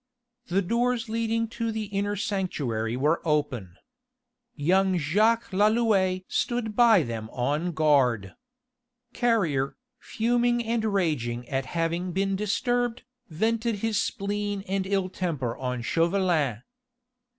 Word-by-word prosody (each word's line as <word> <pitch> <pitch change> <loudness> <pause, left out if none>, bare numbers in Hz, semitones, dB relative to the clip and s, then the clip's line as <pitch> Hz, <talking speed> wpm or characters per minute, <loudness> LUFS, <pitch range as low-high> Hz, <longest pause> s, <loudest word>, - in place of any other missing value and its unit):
The 195 +3 +1
doors 235 +3 0
leading 230 0 0
to 230 0 -3
the 220 0 -3
inner 205 0 -2
sanctuary 140 - -2
were 150 +5 +1
open. 140 - -1 0.8
Young 185 +5 +2
Jacques 210 +10 +2
Lalouët 200 -2 +2
stood 235 -3 -1
by 225 -7 +6
them 115 -3 -5
on 145 +8 -1
guard. 135 - +2 0.8
Carrier, 170 - +1 0.2
fuming 240 +1 +1
and 230 0 0
raging 145 - -1
at 135 -1 -2
having 170 +2 -1
been 195 +1 0
disturbed, 245 +4 -1 0.3
vented 225 +7 0
his 220 -3 +1
spleen 205 0 -2
and 190 0 -1
ill 195 -1 +1
temper 155 -11 -3
on 125 -2 -3
Chauvelin. 165 - +1
190 Hz, 115 wpm, -26 LUFS, 150-220 Hz, 0.8 s, by